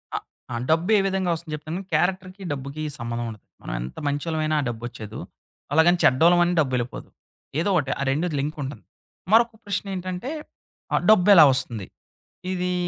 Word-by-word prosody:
అ - - +1 0.4
ఆ! - - -2 0.2
డబ్బు 165 +4 +2
ఏ - - +4
విధంగా 190 -2 0
వస్తుంది 160 -1 -7
చెప్తాను, 155 +5 -5
క్యారెక్టర్‌కి 185 +1 0
డబ్బుకి 140 +2 -5 0.2
సంబంధం 120 0 -3
ఉండది. 110 -3 -11 0.2
మనం - - -6
ఎంత 65 - -7
మంచోళ్ళమైనా 155 +2 -1
ఆ - - -3
డబ్బు 115 0 -6
వచ్చేదు. 110 -2 -8 0.5
అలాగని 170 +3 +5
చెడ్డవాళ్ళమని 175 +6 +5
డబ్బెళ్ళిపోదు. 130 -4 -1 0.5
ఏదో 185 - +1
ఒకటి 140 -6 +1
ఆ - - -2
రెండు 155 +6 0
లింక్ 150 +3 -3
ఉంటుంది. 135 +2 -7 0.5
మరొక 230 +1 +5
ప్రశ్న 200 0 -2
ఏంటంటే 185 +6 -4 0.6
ఆహ్, - - +3
డబ్బెలా 195 -5 +8
వొస్తుంది? 115 -6 -3 0.7
ఇది. 180 0 -1
160 Hz, 155 wpm, -24 LUFS, 135-180 Hz, 0.7 s, డబ్బెలా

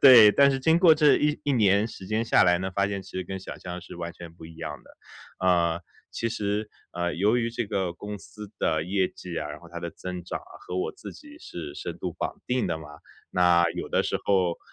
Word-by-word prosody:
对， 120 -6 +10
但 140 +3 +6
是 135 - 0
经 160 +4 +4
过 170 -3 +7
这 150 -1 +5
一 150 0 +1
一 145 - +1
年 105 -3 +4
时 95 -4 -10
间 110 +2 0
下 115 - +5
来 90 -1 +4
呢， 95 +1 -3
发 100 0 +2
现 100 -1 -3
其 - - -14
实 95 - -2
跟 95 - -5
想 95 - -8
象 90 0 -6
是 90 - -11
完 85 0 -5
全 85 0 -11
不 85 - -13
一 80 0 -13
样 80 -2 -5
的。 - - -18 0.6
呃， 85 -2 +3 0.3
其 115 - -2
实 105 -1 -2 0.2
呃， 85 0 -1
由 105 +6 +3
于 115 -1 0
这 120 +1 -2
个 95 -3 -1
公 105 +2 -7
司 100 +4 -11
的 80 0 +1
业 95 0 +1
绩 90 -2 -7
啊， 75 - -4
然 75 - -7
后 85 - -14
它 85 - -6
的 85 -1 -4
增 90 +2 -6
长 - - -4
啊 - - -17
和 90 - -4
我 90 - -1
自 - - -9
己 300 0 -14
是 80 - -8
深 - - -6
度 - - -3
绑 - - -4
定 125 0 +1
的 85 -3 -1
嘛， 75 -2 -10 0.4
那 90 -1 +4
有 85 - -5
的 - - +2
时 - - -1
候 95 -4 +2
95 Hz, 265 characters per minute, -26 LUFS, 85-110 Hz, 0.6 s, 对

